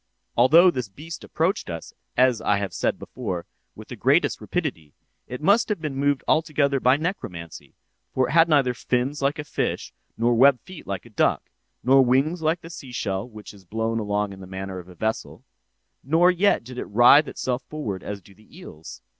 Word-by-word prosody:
"'Although 165 +9 +6
this 125 -8 -4
beast 155 +11 -9
approached 180 +6 -1
us, 85 -1 -7 0.2
as 125 -2 +3
I 105 - +2
have 100 -2 -3 0.3
before 90 -2 -5
said, - - -47
with - - -12
the - - -6
greatest - - +2
rapidity, 75 -2 -4 0.3
it 125 +4 -7
must 205 +7 +3
have 210 -4 -1
been 155 -4 -4
moved 140 0 0
altogether 150 -3 +2
by 130 +2 +4
necromancy—for 130 - -5
it - - -5
had 165 +1 +5
neither 140 -5 +3
fins 125 +4 -2
like 140 +3 0
a 150 - -4
fish - - -3 0.2
nor 120 +1 +2
web 130 +2 +5
feet 185 -3 -12
like 100 +2 -4
a 120 - -15
duck, 105 - 0 0.3
nor 135 +1 +6
wings 135 +7 +1
like 160 +2 0
the 165 - -11
seashell 120 - -4
which 105 -2 -11
is 100 -2 -17
blown 110 +4 -2
along 105 -1 -2
in 95 - -12
the 95 - -10
manner 95 0 -6
of 90 - -12
a 90 - -14
vessel; 110 +5 -4 0.6
nor 165 +6 +4
yet 185 - +2
did 125 +1 -8
it - - -4
writhe 120 +7 +6
itself 125 0 -3
forward 110 - -4
as 100 0 -6
do 95 +3 -18
the 110 - -19
eels. 80 - -11
125 Hz, 190 wpm, -24 LUFS, 105-155 Hz, 0.6 s, Although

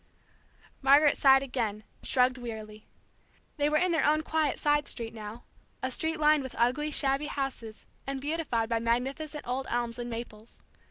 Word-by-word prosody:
Margaret 285 +2 +5
sighed 270 -1 +5
again, 225 -5 -3 0.2
shrugged 255 0 +2
wearily. 215 -3 -8 0.7
They 290 0 +2
were 305 - +2
in 365 +2 +2
their 325 - +2
own 310 +1 +3
quiet 315 -3 0
side 295 0 +1
street 230 -2 -1
now, 220 +1 -8 0.4
a 260 - -1
street 320 +4 -2
lined 305 -1 +4
with 260 -2 -7
ugly, 255 +6 +1
shabby 280 0 +2
houses 265 -7 -5 0.2
and 275 0 -3
beautified 285 -6 -1
by 230 0 0
magnificent 270 +6 -2
old 255 +2 -2
elms 240 0 -2
and 240 0 -4
maples. 230 -1 -8
265 Hz, 160 wpm, -29 LUFS, 235-295 Hz, 0.7 s, Margaret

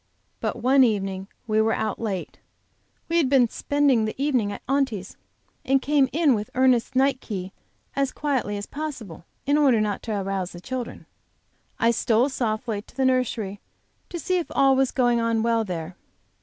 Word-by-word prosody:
But - - -3
one 265 +2 +5
night 195 -5 +1 0.2
we 215 -1 +2
were 220 0 +2
out 215 -2 -2
late; 200 -5 -4 0.7
we 335 - +1
had 305 -6 +3
been 260 -3 +5
spending 280 -5 +2
the 215 - -5
evening 255 -8 +1
at - - -8
Aunty's, 260 -9 -1 0.5
and 270 +1 +3
came 280 -1 +2
in 310 -3 +3
with 210 -2 -2
Ernest's 255 -1 +3
night 265 0 +2
key 190 -3 -5 0.4
as 275 -1 +1
quietly 260 -8 -1
as 205 - -5
possible, 255 - -7 0.2
in 290 +2 +3
order 265 -6 +4
not 210 -2 -1
to 215 -3 -3
arouse 195 -2 -3
the 175 - -9
children. 250 +5 -6 0.7
I 230 0 +3
stole 235 +3 +2
softly 225 -4 -2
to 240 - -21
the 265 - +2
nursery 230 -6 0 0.5
to 350 - -5
see 365 +3 0
if 340 - -4
all 270 -1 +5
was 265 -1 +2
going 245 -2 +2
on 230 -1 +1
well 230 -1 +2
there. 175 -3 -5
240 Hz, 175 wpm, -24 LUFS, 210-270 Hz, 0.7 s, one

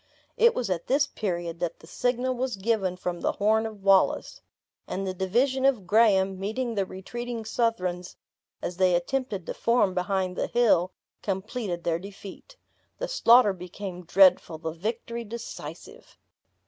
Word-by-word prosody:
It 470 0 +4
was 230 -6 -2
at 170 -2 -2
this 285 +3 +3
period, 175 - -4
that 170 -1 -3
the - - -15
signal 250 +7 -1
was 255 -1 -2
given 195 -2 0
from 180 -1 -4
the - - 0
horn 220 +2 +2
of 210 -3 -11
Wallace; 195 -1 +3 0.5
and 195 - -3
the 190 - -2
division 245 +9 +1
of 260 -8 +2
Graham, 195 -2 +3
meeting 230 +5 -2
the 200 -3 -1
retreating 235 +5 -6
Southrons 185 -6 -1 0.5
as 175 - -4
they 185 -2 +4
attempted 200 0 -2
to - - -4
form 230 -5 +2
behind 185 0 -1
the - - -1
hill, 215 -7 +3 0.3
completed 195 -2 -3
their 165 -1 0
defeat. 200 - -11 0.4
The - - -3
slaughter 245 - +5
became 180 0 -7
dreadful, 180 -2 +4
the 160 0 -4
victory 225 +7 -4
decisive. 230 +1 -9
195 Hz, 150 wpm, -27 LUFS, 180-235 Hz, 0.5 s, slaughter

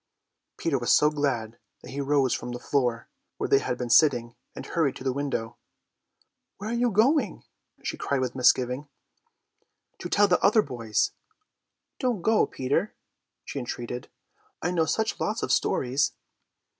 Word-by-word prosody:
Peter 145 -5 0
was 120 - +1
so 150 +1 +5
glad 120 -6 -2 0.2
that - - -10
he 140 +1 -3
rose 140 -2 +2
from 125 - -4
the 120 - -5
floor, 120 -4 0 0.3
where - - -2
they 135 - +5
had 125 - -2
been 125 - -3
sitting, 120 -3 +4 0.2
and - - -7
hurried 155 -6 0
to - - -9
the 130 -1 0
window. 135 -5 -3 1.0
"Where 210 +3 -5
are - - -1
you 240 +1 +2
going?" 240 - +2 0.4
she - - -3
cried 140 - -1
with 130 - -2
misgiving. 125 +2 +2 1.1
"To - - -5
tell 205 0 +4
the 180 - +2
other 215 +2 +5
boys." 115 - -1 0.9
"Don't 245 -9 -1
go 220 0 +3
Peter," 140 +11 -1 0.5
she - - -5
entreated, 120 0 -5 0.5
"I 175 - -1
know 165 -3 +2
such 220 +6 -1
lots 215 +2 -1
of - - -1
stories." 130 +2 +1
140 Hz, 155 wpm, -26 LUFS, 125-180 Hz, 1.1 s, so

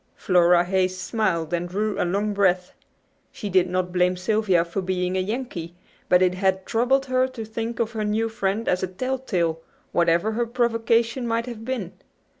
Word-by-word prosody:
Flora 175 -1 +4
Hayes 185 0 0
smiled 180 -8 -1
and 175 +1 -1
drew 210 +3 -1
a - - +2
long 200 +4 0
breath. 185 -2 +1 0.6
She 205 - -6
did 185 -1 +3
not 180 0 -1
blame 180 0 +2
Sylvia 190 -2 +2
for 170 +3 -3
being 180 0 -1
a - - +1
"Yankee," 185 -5 -4 0.3
but 180 0 +5
it 180 -1 +3
had 190 0 0
troubled 260 +4 +2
her 255 -1 +2
to 250 -4 -7
think 225 +1 -4
of 230 -1 0
her 220 -2 -3
new 215 +2 0
friend 220 0 -2
as 180 - +1
a 185 - -1
"telltale," 185 -6 -2 0.3
whatever 170 +4 +2
her 235 +2 -1
provocation 235 0 +1
might 230 0 0
have 235 -3 -7
been. 225 -8 -3
195 Hz, 180 wpm, -24 LUFS, 180-230 Hz, 0.6 s, but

